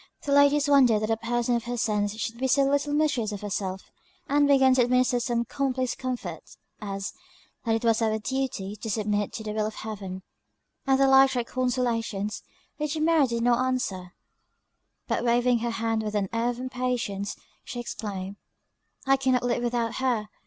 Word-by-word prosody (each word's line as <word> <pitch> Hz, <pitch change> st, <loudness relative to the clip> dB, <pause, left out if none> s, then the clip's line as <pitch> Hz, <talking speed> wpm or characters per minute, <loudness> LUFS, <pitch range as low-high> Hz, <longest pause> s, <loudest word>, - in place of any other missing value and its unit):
The 285 Hz, -, -2 dB
ladies 285 Hz, +1 st, +5 dB
wondered 255 Hz, -7 st, +5 dB
that 215 Hz, -, 0 dB
a -, -, +3 dB
person 240 Hz, +1 st, 0 dB
of 235 Hz, -, -2 dB
her 245 Hz, 0 st, -3 dB
sense 210 Hz, -2 st, 0 dB
should 230 Hz, +1 st, -4 dB
be 265 Hz, -, +1 dB
so 275 Hz, +2 st, +4 dB
little 285 Hz, +1 st, +1 dB
mistress 290 Hz, -8 st, +1 dB
of 205 Hz, -, -6 dB
herself; 190 Hz, -2 st, -4 dB, 0.4 s
and 290 Hz, +1 st, +3 dB
began 265 Hz, -2 st, +5 dB
to 255 Hz, -, +4 dB
administer 250 Hz, 0 st, +2 dB
some 235 Hz, 0 st, -1 dB
common 270 Hz, +1 st, -2 dB
place 255 Hz, -2 st, -1 dB
comfort, 255 Hz, -2 st, -5 dB, 0.4 s
as, 195 Hz, -1 st, -4 dB, 0.5 s
that 225 Hz, -1 st, +2 dB
it 225 Hz, -, -2 dB
was 225 Hz, 0 st, +3 dB
our 220 Hz, -1 st, +1 dB
duty 220 Hz, -4 st, -3 dB
to 220 Hz, +2 st, -7 dB
submit 210 Hz, -1 st, -1 dB
to 220 Hz, -, -5 dB
the 215 Hz, -, -4 dB
will 215 Hz, 0 st, 0 dB
of 215 Hz, -, -7 dB
Heaven, 195 Hz, -4 st, -6 dB, 0.6 s
and 270 Hz, 0 st, +3 dB
the 275 Hz, -, +5 dB
like 270 Hz, 0 st, +7 dB
trite 245 Hz, -2 st, -1 dB
consolations, 235 Hz, -5 st, -1 dB, 0.4 s
which 300 Hz, +1 st, -2 dB
Mary 315 Hz, -3 st, +4 dB
did 235 Hz, -1 st, -2 dB
not 245 Hz, +1 st, +3 dB
answer; 195 Hz, -9 st, -2 dB, 0.9 s
but -, -, -1 dB
waving 240 Hz, 0 st, +3 dB
her 235 Hz, +1 st, -2 dB
hand, 225 Hz, -1 st, -1 dB
with 215 Hz, -1 st, -4 dB
an 200 Hz, -2 st, 0 dB
air 230 Hz, +1 st, +1 dB
of 245 Hz, 0 st, -4 dB
impatience, 250 Hz, -6 st, -2 dB, 0.3 s
she 245 Hz, -, -6 dB
exclaimed, 200 Hz, -4 st, -5 dB, 0.7 s
"I 270 Hz, 0 st, +4 dB
cannot 260 Hz, -2 st, +1 dB
live 245 Hz, -1 st, 0 dB
without 240 Hz, -1 st, -1 dB
her! 240 Hz, -5 st, 0 dB
240 Hz, 185 wpm, -26 LUFS, 215-260 Hz, 0.9 s, like